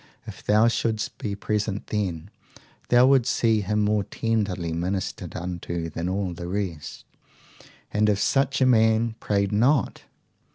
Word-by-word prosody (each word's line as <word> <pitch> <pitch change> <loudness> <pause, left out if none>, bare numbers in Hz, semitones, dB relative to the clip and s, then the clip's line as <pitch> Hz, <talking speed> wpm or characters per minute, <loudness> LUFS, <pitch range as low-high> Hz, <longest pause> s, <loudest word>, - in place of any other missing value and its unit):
If - - -10
thou 105 +2 +4
shouldst 110 -2 -1
be 100 -2 -3
present 105 0 -2
then, 95 -3 -3 0.6
thou 120 +1 +6
wilt 130 -2 +4
see 115 -4 +2
him 105 +2 0
more 105 0 +1
tenderly 100 -6 -2
ministered 90 +3 -3
unto 85 -1 -4
than 85 +3 -3
all 95 -1 -2
the 85 +1 -7
rest. 90 -5 -5 0.9
And 105 0 +2
if 105 - +2
such 135 +3 +1
a - - +5
man 110 -2 +3
prayed 100 -1 0
not? 125 +7 +2
105 Hz, 140 wpm, -25 LUFS, 90-110 Hz, 0.9 s, thou